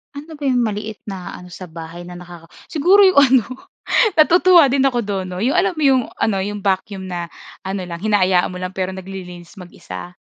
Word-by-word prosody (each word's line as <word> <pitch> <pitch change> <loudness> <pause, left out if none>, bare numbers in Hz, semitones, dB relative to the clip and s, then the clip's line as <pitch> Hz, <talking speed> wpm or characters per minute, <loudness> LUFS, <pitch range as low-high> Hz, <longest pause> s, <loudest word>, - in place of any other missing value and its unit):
Ano 305 +3 -9
ba 295 - -11
'yung 260 -3 +2
maliit 215 -2 -3
na 190 -3 -6
ano 180 - -12
sa 180 -1 -11
bahay 165 +1 -9
na 175 0 -10
nakaka 175 -2 -13 0.2
siguro 350 +6 +3
'yung 380 -2 +6
ano, 265 -5 +5 0.7
natutuwa 345 +1 +6
din 270 0 +1
ako 265 -3 +2
dun 190 -2 -3
'no, 180 - -6
'yung 245 +8 0
alam 365 +2 +3
mo - - -2
'yung 260 -2 +4 0.2
ano, 195 -3 0
yung 205 +1 -4
vacuum 195 0 -2
na 175 -2 -5 0.3
ano 190 -1 -4
lang, 170 0 -8
hinaayaan 190 -4 +2
mo 180 - -7
lang 185 +1 -5
pero 190 -1 -2
naglilinis 185 -2 -9
mag-isa? 180 - -10
195 Hz, 200 wpm, -19 LUFS, 180-265 Hz, 0.7 s, yung